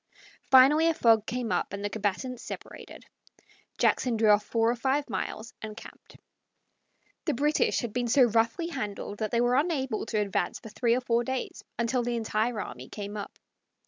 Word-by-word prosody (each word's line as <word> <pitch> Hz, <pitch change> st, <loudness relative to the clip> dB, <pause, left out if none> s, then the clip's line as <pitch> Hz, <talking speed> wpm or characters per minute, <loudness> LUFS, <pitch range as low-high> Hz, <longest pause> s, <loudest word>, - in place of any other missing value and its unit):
Finally 280 Hz, +5 st, +7 dB
a 330 Hz, -, +2 dB
fog 225 Hz, -6 st, +4 dB
came 245 Hz, -2 st, -2 dB
up -, -, 0 dB
and 200 Hz, +1 st, -4 dB
the -, -, 0 dB
combatants 220 Hz, +4 st, -2 dB
separated. -, -, -9 dB, 0.7 s
Jackson 245 Hz, -3 st, +2 dB
drew 220 Hz, -1 st, +3 dB
off 210 Hz, 0 st, +4 dB
four 225 Hz, +2 st, +1 dB
or -, -, -1 dB
five 270 Hz, +4 st, 0 dB
miles 215 Hz, +3 st, -4 dB
and 215 Hz, -1 st, -7 dB
camped. -, -, -13 dB, 1.1 s
The 305 Hz, -, 0 dB
British 295 Hz, +4 st, +1 dB
had 235 Hz, -4 st, -5 dB
been 245 Hz, -1 st, -1 dB
so 260 Hz, +3 st, +5 dB
roughly 230 Hz, +8 st, +1 dB
handled 210 Hz, -7 st, -5 dB
that 215 Hz, -1 st, -1 dB
they 235 Hz, +2 st, +1 dB
were 245 Hz, +1 st, +2 dB
unable 270 Hz, -8 st, -1 dB
to 220 Hz, -, -2 dB
advance 205 Hz, -2 st, -1 dB
for 225 Hz, -, -11 dB
three 235 Hz, +2 st, +1 dB
or 255 Hz, -, -1 dB
four 235 Hz, -1 st, +1 dB
days, 260 Hz, +1 st, -4 dB
until 235 Hz, +2 st, 0 dB
the 240 Hz, 0 st, -2 dB
entire 220 Hz, 0 st, -1 dB
army 125 Hz, -8 st, -7 dB
came 205 Hz, 0 st, -6 dB
up. 205 Hz, -1 st, -7 dB
235 Hz, 180 wpm, -28 LUFS, 215-255 Hz, 1.1 s, Finally